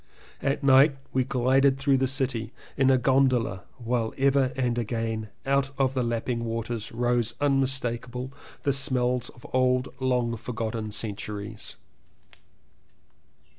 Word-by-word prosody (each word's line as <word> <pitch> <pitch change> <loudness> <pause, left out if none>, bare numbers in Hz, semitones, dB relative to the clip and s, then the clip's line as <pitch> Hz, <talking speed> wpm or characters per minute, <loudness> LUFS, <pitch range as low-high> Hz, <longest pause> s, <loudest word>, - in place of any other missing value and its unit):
At 140 +1 -1
night 135 +2 +6 0.2
we 130 - +2
glided 135 +2 +3
through 135 0 +2
the 130 - +2
city 125 -4 -1 0.2
in 135 -1 +3
a 130 - +5
gondola 125 -6 +2 0.2
while 115 -2 -1
ever 135 -1 +3
and 125 -2 0
again 115 -1 -2 0.2
out 135 0 +2
of 135 -2 +2
the 130 - 0
lapping 120 0 -1
water 115 0 -3
rose 120 0 0
unmistakable 130 -2 -1 0.3
the 140 - +2
smells 125 -2 +1
of 120 - -16
old 130 0 +2
long 125 -3 0
forgotten 110 -1 -4
centuries. 105 0 -5
125 Hz, 125 wpm, -26 LUFS, 115-135 Hz, 0.3 s, night